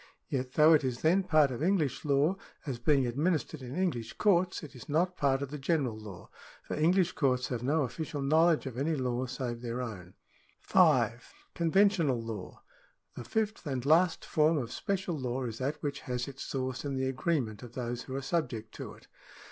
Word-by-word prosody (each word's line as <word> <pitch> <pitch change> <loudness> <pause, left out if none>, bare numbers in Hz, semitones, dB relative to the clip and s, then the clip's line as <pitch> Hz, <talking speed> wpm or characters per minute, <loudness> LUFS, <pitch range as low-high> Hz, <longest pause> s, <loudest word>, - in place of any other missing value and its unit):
Yet 130 -1 -2
though 155 +1 +7
it 150 - +4
is 125 -2 -2
then 175 +5 +4
part 155 -6 +3
of 125 - -5
English 165 -6 +1
law, 145 +5 +3 0.3
as 130 -5 -4
being 135 +1 +3
administered 155 +4 -1
in 130 +1 -7
English 160 -12 -1
courts, 185 -3 +2
it 150 - -9
is 125 - -12
not 175 +5 +1
part 140 -3 +1
of 140 - -6
the 150 - -5
general 135 -5 0
law, 105 -5 -10 0.3
for - - -6
English 175 +3 +3
courts 130 -7 +1
have 125 -3 -3
no 145 +5 +1
official 145 +2 -4
knowledge 160 +3 +3
of 130 -2 -5
any 155 +3 +1
law 130 -1 -1
save 120 -2 -4
their 120 0 -4
own. 95 -7 -6 0.4
5. - - +3 0.2
Conventional 170 - +3
law. 115 -4 -7 0.3
— - - -42
The - - -6
fifth 215 - -2
and 130 -3 -2
last 165 +3 +3
form 155 +1 +3
of 120 -4 -3
special 190 0 -2
law 130 0 -2
is 115 -2 -5
that 140 +4 -1
which 145 -1 -2
has 125 -1 -3
its 135 -1 -9
source 130 -1 -3
in 140 -2 -3
the 130 0 0
agreement 130 -5 -1
of 120 -2 -10
those 120 -1 -3
who 130 - -7
are 135 - -3
subject 125 -8 -2
to - - -7
it. - - -19
140 Hz, 195 wpm, -30 LUFS, 125-160 Hz, 0.4 s, though